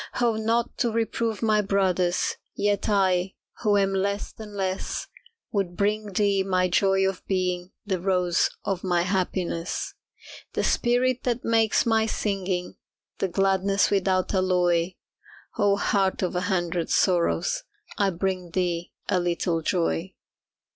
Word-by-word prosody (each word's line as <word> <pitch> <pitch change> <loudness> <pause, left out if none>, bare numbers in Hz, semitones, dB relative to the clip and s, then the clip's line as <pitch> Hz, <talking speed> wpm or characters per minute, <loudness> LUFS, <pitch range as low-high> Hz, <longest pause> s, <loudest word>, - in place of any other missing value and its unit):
Oh, 235 -2 +2
not 230 +2 0
to 240 -3 +2
reprove 225 0 -1
my 215 -1 +3
brothers, 185 -3 +1 0.2
Yet 205 +1 0
I, 190 -2 +2 0.3
who 210 -3 +3
am 195 -1 +2
less 200 +1 -1
than 210 -2 -10
less, 190 0 -2 0.5
Would 195 -5 -2
bring 210 0 0
thee 200 0 +2
my 185 -1 +1
joy 195 +1 +3
of 190 -1 -4
being 180 -1 -1
The 190 -3 -1
rose 180 -2 +2 0.2
of 190 -2 -2
my 175 -2 +2
happiness. 180 -2 -2 0.6
The - - 0
spirit 245 +1 +2
that 245 -1 -2
makes 225 -1 +3
my 225 -1 +2
singing 190 -4 -2 0.4
The 195 - +1
gladness 195 +1 +2
without 190 -1 +1
alloy, 180 -2 +2 0.7
Oh, 205 -1 +4
Heart 195 -2 +1
of 180 - -1
a 180 - +1
Hundred 175 -3 -1
Sorrows, 190 - +2 0.3
I 200 -1 +2
bring 185 0 -2
thee 175 -1 -2
a 185 - +2
little 170 -1 0
joy. 80 - -1
195 Hz, 135 wpm, -25 LUFS, 180-205 Hz, 0.7 s, Oh